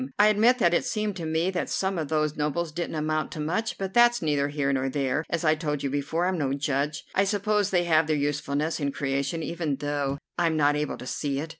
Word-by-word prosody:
I 210 +1 +6
admit 225 +4 +4
that 175 -8 +3
it - - +2
seemed 215 -2 -2
to 165 -2 -4
me 160 +4 +1
that 180 - -2
some 190 -2 -1
of 155 - -2
those 155 0 0
nobles 150 +2 -1
didn't 170 +1 -4
amount 155 0 -1
to 155 - -7
much. 185 +9 -1
But 195 -1 -4
that's 240 0 +5
neither 145 -3 +1
here 140 -1 0
nor 135 0 0
there; 140 +1 -1
as 170 0 -1
I 155 - +5
told 150 -2 -3
you 140 - -1
before, 145 +5 -1
I'm 185 -2 0
no 135 -2 0
judge. 145 +1 -1
I 195 - +3
suppose 205 0 +1
they 180 -2 +2
have 160 -2 +3
their 155 - +2
usefulness 145 +2 -1
in 140 -2 -1
creation, 140 +4 -2
even 160 -3 -2
though 145 -1 -2 0.2
I'm 165 -2 +2
not 145 -1 +3
able 150 0 -2
to - - -9
see 140 +1 -2
it. 160 +3 -5
155 Hz, 240 wpm, -26 LUFS, 145-175 Hz, 0.2 s, I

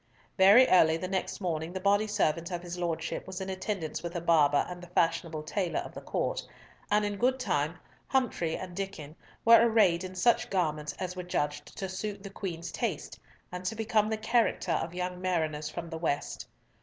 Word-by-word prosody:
Very 205 +7 +7
early 160 -3 +5
the 185 - -4
next 190 0 -2
morning 165 -2 -2
the 190 - -3
body 200 +3 +3
servant 170 -5 0
of 175 -1 -4
his 175 0 -5
Lordship 170 -2 -3
was 190 0 -5
in 190 0 -4
attendance 185 -4 -3
with 170 +1 -6
a - - 0
barber 155 -4 +4
and 180 0 -7
the 175 - -10
fashionable 165 -2 0
tailor 180 +2 -1
of - - -9
the - - -8
Court, - - -2 0.5
and 210 0 +3
in 205 -1 -2
good 260 +2 +2
time 155 - 0 0.3
Humfrey 235 -11 0
and 180 -1 -7
Diccon 175 -6 -5 0.3
were 230 0 +9
arrayed 210 -7 +4
in 185 0 -7
such 230 +6 +3
garments 155 -5 -1
as 185 -1 -5
were 185 - -4
judged 150 -4 -3
to 195 - -3
suit 195 +1 -5
the 200 - -8
Queen's 175 -4 -5
taste, 195 -11 -3 0.3
and 180 0 -6
to 185 +4 -2
become 220 -1 +1
the 220 - -1
character 225 -4 +1
of 165 +1 -1
young 180 0 -3
mariners 155 -5 -1
from 170 +1 -6
the 165 - -4
West. 145 -3 -2
180 Hz, 195 wpm, -29 LUFS, 165-205 Hz, 0.5 s, were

